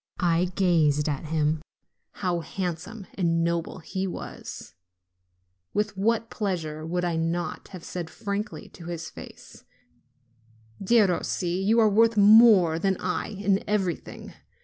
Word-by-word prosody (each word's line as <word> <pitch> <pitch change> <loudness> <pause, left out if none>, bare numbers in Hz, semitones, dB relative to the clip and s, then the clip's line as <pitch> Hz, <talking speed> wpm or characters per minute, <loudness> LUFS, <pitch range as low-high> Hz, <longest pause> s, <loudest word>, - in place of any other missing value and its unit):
I 175 -1 +2
gazed 155 -6 +3
at 145 0 -2
him: 155 0 0 0.5
how 180 -3 -1
handsome 185 +4 -5
and 165 -3 +1
noble 170 +1 -1
he 190 +2 -4
was! 175 - -8 1.0
With 210 0 0
what 225 +3 0
pleasure 165 -7 -3
would 175 +2 -2
I 170 -1 -1
not 165 +2 -2
have 185 -3 -10
said 175 -3 -5
frankly 200 -4 -5
to 170 - -13
his 165 -2 -6
face: - - -12 1.2
"Derossi, 190 -3 +1
you 220 +4 +3
are 220 - +6
worth 225 +2 +3
more 205 -6 +7
than 190 +1 +1
I 180 0 -2
in 200 -1 0
everything! 190 -5 -2
180 Hz, 125 wpm, -26 LUFS, 165-205 Hz, 1.2 s, more